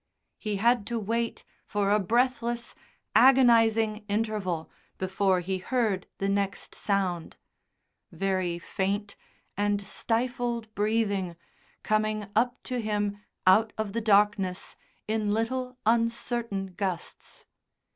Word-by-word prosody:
He 210 -2 -2
had 230 +1 +2
to 235 - -2
wait 230 +2 -2 0.2
for 205 -1 0
a 210 - +4
breathless, 235 +2 0 0.4
agonising 225 -3 +5
interval 205 -6 -1 0.3
before 190 0 +1
he 185 +1 -2
heard 215 -3 0
the 195 - -1
next 200 0 -1
sound, 185 -5 -1 0.7
very 185 -3 -1
faint 200 +4 -2 0.4
and 205 0 +1
stifled 235 +1 -1
breathing 205 -4 0 0.5
coming 215 0 0
up 245 +2 +1
to 250 -1 -2
him 205 -1 -1 0.2
out 215 +4 +5
of 215 -2 -3
the 230 - -1
darkness 205 -3 +2 0.3
in 215 -1 0
little 250 +3 -2
uncertain 230 -3 0
gusts. 185 -2 -5
215 Hz, 105 wpm, -28 LUFS, 195-230 Hz, 0.7 s, agonising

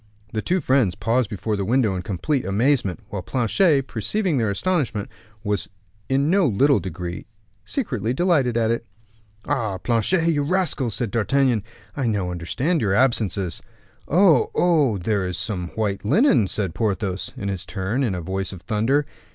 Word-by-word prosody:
The 110 - -1
two 180 +7 0
friends 130 - +2
paused 115 +2 0
before 105 +1 -2
the 100 - -2
window 110 -1 +2
in 90 - -3
complete 105 - -1
amazement, 110 -1 +1
while 100 - -4
Planchet, 135 - +2
perceiving 150 - -1
their 110 -3 +1
astonishment, 125 - -1 0.3
was 105 -3 -1 0.4
in 135 +2 +2
no 185 0 +3
little 135 +3 +3
degree 90 -1 -6 0.4
secretly 125 - -2
delighted 135 -5 +2
at 115 -1 +2
it. 115 0 -2 0.6
"Ah! 110 -7 -1
Planchet, 125 - +1
you 150 -3 +2
rascal," 150 -5 0
said 115 0 -2
D'Artagnan, 120 +1 +2 0.3
"I 135 -4 -1
now 100 -5 -1
understand 125 - -1
your 100 -3 +1
absences." 105 -8 +1 0.5
"Oh, 175 -1 +4
oh! 150 - +3
there 95 +1 -1
is 90 -1 -4
some 90 -5 -2
white 105 -3 -1
linen!" 205 - +4
said 95 -3 -2
Porthos, 100 -3 -2
in 100 - -4
his 95 -2 -3
turn, 105 +7 -2
in 105 -7 0
a 90 - -4
voice 95 +2 -3
of 95 -3 -10
thunder. 120 +7 +1
115 Hz, 160 wpm, -23 LUFS, 100-140 Hz, 0.6 s, Oh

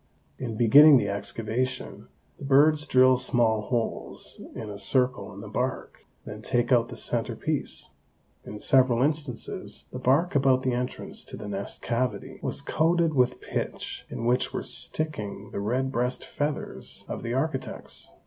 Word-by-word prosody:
In 115 -4 -4
beginning 140 +6 +8
the 100 -4 0
excavation, 115 +6 -3 0.3
the - - -10
birds 150 +3 +4
drill 130 0 +5
small 120 -3 +2
holes 115 +1 -3
in 110 - -6
a 100 -1 -7
circle 125 0 +1
in 100 0 -10
the 105 - -8
bark, 125 +5 -4 0.2
then - - -8
take 120 +1 0
out 120 -2 +4
the - - -7
center - - -1
piece. - - -3 0.5
In 105 - -8
several 130 -1 +4
instances 145 -4 -2
the 125 - -6
bark 135 +8 +2
about 135 -2 +3
the 130 - +1
entrance 125 +1 -4
to - - -8
the - - -7
nest 100 -1 -4
cavity 125 +1 -2
was - - -3
coated 165 0 +2
with 125 -2 +2
pitch - - -4
in 115 - -5
which 125 +1 +2
were - - -3
sticking 105 -10 -3
the - - -4
red 130 +6 0
breast 125 0 -1
feathers 145 0 -4
of - - -5
the 120 +1 -3
architects. 135 0 -3
125 Hz, 160 wpm, -27 LUFS, 115-135 Hz, 0.5 s, beginning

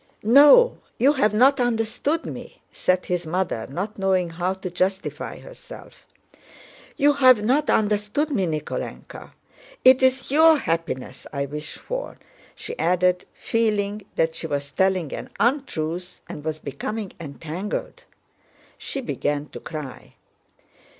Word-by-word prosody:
"No, 290 - +7 0.2
you 275 +4 +4
have 240 -8 +2
not 260 +6 +4
understood 245 +6 0
me," - - -8
said 185 0 0
his 175 -2 -2
mother, 165 -9 -2
not 195 +9 -5
knowing 185 -3 +1
how 180 +3 -2
to 190 -1 -7
justify 190 +2 -2
herself. - - -13 0.9
"You 290 +1 +4
have 255 -6 +5
not 275 +7 +2
understood 210 +8 +1
me, 195 -9 +1
Nikólenka. 155 -2 -6 0.5
It 260 0 +7
is 260 0 +2
your 320 +2 +6
happiness 165 - -3
I 140 -1 -2
wish 150 +2 -7
for," - - -6 0.4
she 470 - -7
added, 180 0 +2
feeling 210 -2 -1
that 160 0 +1
she 165 - -6
was 140 -1 -3
telling 185 -1 +1
an - - -6
untruth 180 - -1
and 150 - -8
was 155 0 -3
becoming 185 - -5
entangled. 165 +5 -6 0.7
She 275 - -5
began 145 - -2
to - - -9
cry. 150 -5 -8
195 Hz, 130 wpm, -23 LUFS, 165-255 Hz, 0.9 s, No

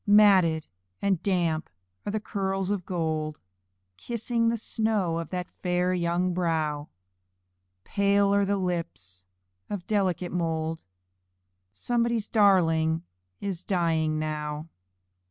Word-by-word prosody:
Matted 190 -6 +6 0.3
and 195 -4 +1
damp 170 -5 0 0.4
are - - 0
the 215 - 0
curls 195 -2 -1
of 195 -4 -2
gold 155 -3 -2 0.6
Kissing 235 - 0
the 230 - 0
snow 210 -7 0
of 165 - -5
that 180 -1 -3
fair 180 0 +1
young 175 +1 +1
brow, 155 -4 -1 0.9
Pale 200 0 +3
are 200 0 +3
the 200 +1 +1
lips 95 - -4 0.4
of 200 -4 -4
delicate 185 -4 0
mould 165 -2 -2 0.9
Somebody's 235 - 0
darling 165 -6 +4 0.4
is 190 -4 -3
dying 165 -4 +1
now. 150 0 -3
180 Hz, 110 wpm, -27 LUFS, 160-200 Hz, 0.9 s, Matted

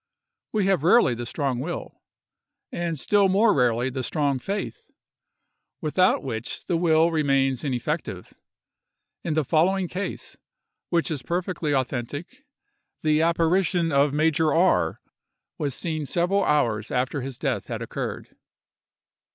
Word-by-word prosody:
We 210 -3 +1
have 195 -6 +2
rarely 170 - +5
the 120 0 -5
strong 135 -2 -2
will, 170 +6 -6 0.7
and 170 -2 -2
still 200 +7 +3
more 210 +3 +4
rarely 125 -1 +1
the 130 0 -3
strong 140 0 0
faith, 200 +9 -5 0.9
without 180 +4 +2
which 120 -3 -5
the 175 - 0
will 165 0 +3
remains 135 -4 +1
ineffective. 130 - -3 0.9
In 160 -3 -1
the 155 -2 +1
following 180 +6 +2
case, 190 +4 -5 0.5
which 170 -1 +1
is 145 -4 -3
perfectly 170 -2 -2
authentic, 135 - -4 0.6
the 155 0 +3
apparition 170 +1 +2
of 140 0 +3
Major 155 +1 +2
R—— 175 +5 +2 0.6
was 145 -4 -2
seen 155 -4 -3
several 180 +5 +1
hours 115 -8 +1
after 130 +3 -1
his 130 -1 -6
death - - -2
had - - -4
occurred. - - -6
155 Hz, 125 wpm, -25 LUFS, 135-175 Hz, 0.9 s, rarely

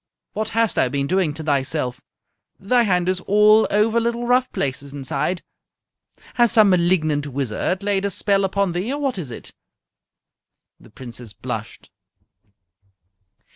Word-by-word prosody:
"What 215 +1 -2
hast 225 -5 +2
thou 125 - +1
been 140 +1 -1
doing 185 0 +1
to 160 - -6
thyself? 140 -3 -1 0.6
Thy 240 +6 +2
hand 180 -5 +1
is 185 0 0
all 210 +2 +5
over 220 +3 +2
little 235 +1 -2
rough 250 +1 +2
places 140 0 -3
inside. 145 +5 -3 0.9
Has 240 -2 +3
some 215 -3 +6
malignant 165 -5 +1
wizard 140 - -2
laid 200 -1 0
a - - +1
spell 200 0 +1
upon 195 0 0
thee, 180 +8 -3
or 285 - -3
what 270 -8 -2
is 150 -7 -6
it?" 115 - -9 1.3
The - - -18
Princess 120 -1 -10
blushed. - - -7
185 Hz, 140 wpm, -21 LUFS, 140-215 Hz, 1.3 s, some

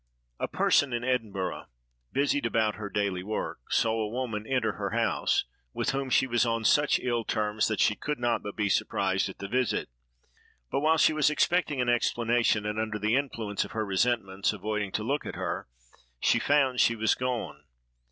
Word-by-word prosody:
A - - -1
person 140 -3 +2
in 120 0 -2
Edinburgh, 110 -8 -2 0.4
busied 140 -1 +1
about 110 -2 +1
her 105 0 -6
daily 100 -3 -1
work, 105 -6 -4
saw 115 0 +2
a 105 - -2
woman 110 -3 -4
enter 125 -5 +1
her - - -4
house, - - +1 0.3
with - - 0
whom 135 -1 -2
she 130 - +4
was 120 -2 +2
on 115 -1 -1
such 145 +4 +4
ill 120 -2 -1
terms 105 -1 0
that 110 - -2
she - - +4
could 150 +6 -3
not 120 -1 0
but 100 - -7
be 105 -1 0
surprised 95 0 0
at 95 - -10
the 100 - -6
visit; 125 +3 0 0.8
but - - +1
while 160 +3 +3
she 155 - +4
was 155 -1 +3
expecting 150 -1 +1
an 125 - 0
explanation, 120 -2 +2
and 105 +1 -2
under 110 -1 -2
the 105 +3 +1
influence 115 -7 -1
of - - -10
her 110 -1 -1
resentment 100 -1 0
avoiding 105 -1 -3
to 105 - -1
look 140 +6 -1
at - - -6
her, - - -3 0.5
she - - +3
found 135 -3 +2
she 115 - +4
was 110 0 +2
gone. 115 - -4
115 Hz, 190 wpm, -28 LUFS, 105-130 Hz, 0.8 s, she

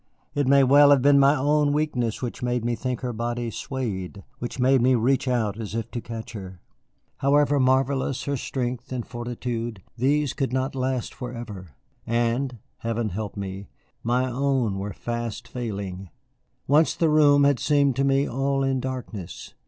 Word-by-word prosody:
It 145 -3 0
may 140 0 +6
well 145 +2 +7
have 140 -3 +5
been 140 0 +6
my 140 +1 +5
own 145 +1 +2
weakness 130 -7 -1
which 120 - -4
made 125 -1 -1
me 120 - +1
think 125 +1 -3
her 125 -2 -3
body 120 +1 -3
swayed, 100 -7 -4 0.2
which 120 - -5
made 130 0 +4
me 130 +1 +4
reach 130 +4 +1
out 115 -4 0
as 110 -1 -5
if 115 0 -3
to 120 - -4
catch 115 +1 -7
her. 95 -4 -8 0.6
However 145 +1 +3
marvellous 130 0 +1
her 140 - -1
strength 125 -1 -4
and 125 -2 -3
fortitude, 120 -3 -5
these 140 +4 +1
could 135 -3 -2
not 130 +1 -1
last 130 -2 -2
forever. 110 - -8 0.3
And 120 +2 0 0.2
Heaven 115 -1 -2
help 105 +2 -5
me 100 0 -5 0.3
my 125 +2 +1
own 130 -5 0
were 100 +1 -4
fast 120 0 -4
failing. 100 -6 -5 0.6
Once 150 +3 +3
the 165 - +2
room 145 -2 +5
had 140 -2 +3
seemed 140 -3 +2
to 135 - +2
me 135 +1 +2
all 135 +2 0
in 135 -1 +1
darkness. 125 -8 -6
125 Hz, 170 wpm, -25 LUFS, 115-135 Hz, 0.6 s, well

